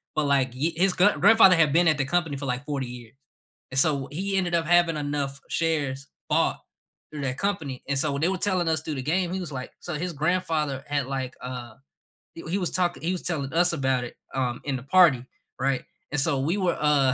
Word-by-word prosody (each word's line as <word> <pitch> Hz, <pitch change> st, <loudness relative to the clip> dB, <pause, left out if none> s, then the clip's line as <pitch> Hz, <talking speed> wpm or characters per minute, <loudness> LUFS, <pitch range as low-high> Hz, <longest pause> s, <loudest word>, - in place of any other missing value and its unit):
but, 155 Hz, -, +1 dB
like, 135 Hz, -3 st, +1 dB
hi 150 Hz, +6 st, 0 dB
his 185 Hz, +3 st, +3 dB
gr 180 Hz, -, +3 dB
grandfather 190 Hz, -4 st, +7 dB
had 155 Hz, -4 st, +3 dB
been 175 Hz, +2 st, +4 dB
at 155 Hz, -2 st, +3 dB
the 140 Hz, -, +1 dB
company 160 Hz, 0 st, 0 dB
for, 140 Hz, -, -5 dB
like, 125 Hz, +2 st, -3 dB
40 140 Hz, -3 st, -3 dB
years, 120 Hz, 0 st, -11 dB, 0.6 s
and 130 Hz, -, -2 dB
so, 140 Hz, -3 st, +1 dB
he 195 Hz, +5 st, -2 dB
ended 180 Hz, -2 st, 0 dB
up 165 Hz, -1 st, +1 dB
having 175 Hz, -1 st, +4 dB
enough 145 Hz, -2 st, -3 dB
shares 145 Hz, -5 st, -1 dB, 0.2 s
bought -, -, +1 dB, 0.5 s
through 150 Hz, -2 st, -5 dB
that 130 Hz, 0 st, -3 dB
company, 170 Hz, -10 st, -2 dB
and, 140 Hz, -, 0 dB
so, 145 Hz, +2 st, +1 dB
when 140 Hz, -, -3 dB
they -, -, +4 dB
were 190 Hz, -, 0 dB
telling 185 Hz, -3 st, +1 dB
us 160 Hz, -2 st, 0 dB
through 155 Hz, -1 st, -4 dB
the 130 Hz, -, -4 dB
game, 180 Hz, -2 st, 0 dB
he 190 Hz, -, -2 dB
was 170 Hz, -5 st, -6 dB
like 130 Hz, -1 st, -6 dB
so 175 Hz, -, -5 dB
his 175 Hz, +4 st, -3 dB
grandfather 155 Hz, -3 st, -1 dB
had 145 Hz, -2 st, -1 dB
like, 130 Hz, -1 st, -4 dB
uh, 125 Hz, -3 st, -7 dB, 0.6 s
he 165 Hz, -, -8 dB
he 190 Hz, -, 0 dB
was 180 Hz, -3 st, -1 dB
talking 175 Hz, -1 st, 0 dB
he 170 Hz, -, 0 dB
was 180 Hz, -, -4 dB
telling 145 Hz, -5 st, -2 dB
us 175 Hz, +2 st, +4 dB
about 130 Hz, -4 st, 0 dB
it, -, -, -10 dB, 0.2 s
um, 125 Hz, -2 st, -1 dB
in 140 Hz, -2 st, -1 dB
the 125 Hz, -, -9 dB
party, 145 Hz, -4 st, +5 dB, 0.4 s
right, 135 Hz, 0 st, 0 dB, 0.3 s
and 145 Hz, -, 0 dB
so 140 Hz, -1 st, +1 dB
we 165 Hz, +8 st, 0 dB
were, 180 Hz, -4 st, 0 dB
uh, 140 Hz, -4 st, +3 dB
150 Hz, 230 wpm, -25 LUFS, 135-175 Hz, 0.6 s, grandfather